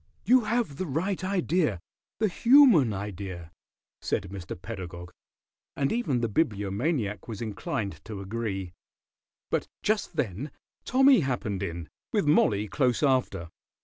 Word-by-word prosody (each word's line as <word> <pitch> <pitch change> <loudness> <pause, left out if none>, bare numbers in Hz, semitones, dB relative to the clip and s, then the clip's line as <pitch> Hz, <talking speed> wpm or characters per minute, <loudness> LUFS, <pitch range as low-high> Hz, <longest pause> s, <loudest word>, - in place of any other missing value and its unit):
"You 250 -2 +5
have 225 - -1
the 185 - -3
right 180 +7 -1
idea, 175 - +1 0.4
the 215 - +2
human 230 - +6
idea," 95 -4 -6 0.5
said - - -1
Mr. 90 -3 -7
Pedagog, 90 -4 -7 0.6
and 140 -1 0
even 150 - 0
the 115 - +1
Bibliomaniac 105 - -1
was 110 -4 -6
inclined 105 -2 -4
to 110 -3 -6
agree. 95 -3 -4 0.8
But - - 0 0.2
just 210 -4 0
then 130 - -2 0.4
Tommy 265 0 +6
happened 125 - -2
in, 85 -4 -4 0.2
with 205 -6 +1
Mollie 105 -9 +3
close 120 +6 +1
after. 130 - +1
115 Hz, 125 wpm, -27 LUFS, -, 0.8 s, human